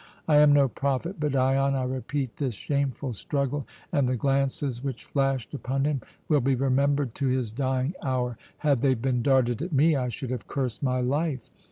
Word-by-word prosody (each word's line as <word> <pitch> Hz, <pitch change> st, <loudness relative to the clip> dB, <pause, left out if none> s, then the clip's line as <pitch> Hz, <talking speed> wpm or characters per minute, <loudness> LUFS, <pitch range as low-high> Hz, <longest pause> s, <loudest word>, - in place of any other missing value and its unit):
I 150 Hz, -2 st, +5 dB
am 150 Hz, 0 st, +7 dB
no 140 Hz, -1 st, +5 dB
prophet, 140 Hz, +8 st, -2 dB
but 150 Hz, -2 st, 0 dB
Dion, 135 Hz, +1 st, +2 dB
I 130 Hz, -, 0 dB
repeat, 130 Hz, 0 st, -3 dB
this 130 Hz, -6 st, -2 dB
shameful 140 Hz, +1 st, -2 dB
struggle 140 Hz, +5 st, -2 dB, 0.2 s
and 140 Hz, -6 st, +2 dB
the 130 Hz, -, +1 dB
glances 135 Hz, -1 st, 0 dB
which 135 Hz, -4 st, -4 dB
flashed 135 Hz, -5 st, -1 dB
upon 135 Hz, 0 st, -1 dB
him 145 Hz, -3 st, 0 dB, 0.3 s
will 150 Hz, -3 st, +3 dB
be 135 Hz, +2 st, +2 dB
remembered 135 Hz, 0 st, +1 dB
to 140 Hz, -, -1 dB
his 125 Hz, -4 st, 0 dB
dying 130 Hz, +4 st, -1 dB
hour. 125 Hz, -2 st, -1 dB, 0.2 s
Had 140 Hz, -5 st, +1 dB
they 135 Hz, -2 st, +3 dB
been 125 Hz, +1 st, 0 dB
darted 130 Hz, -1 st, +2 dB
at 175 Hz, 0 st, -4 dB
me, 150 Hz, +3 st, +4 dB
I 125 Hz, -2 st, 0 dB
should 120 Hz, +2 st, -5 dB
have 125 Hz, -3 st, -4 dB
cursed 125 Hz, -5 st, -3 dB
my 130 Hz, -2 st, +1 dB
life. 140 Hz, 0 st, -1 dB
135 Hz, 190 wpm, -27 LUFS, 125-140 Hz, 0.3 s, am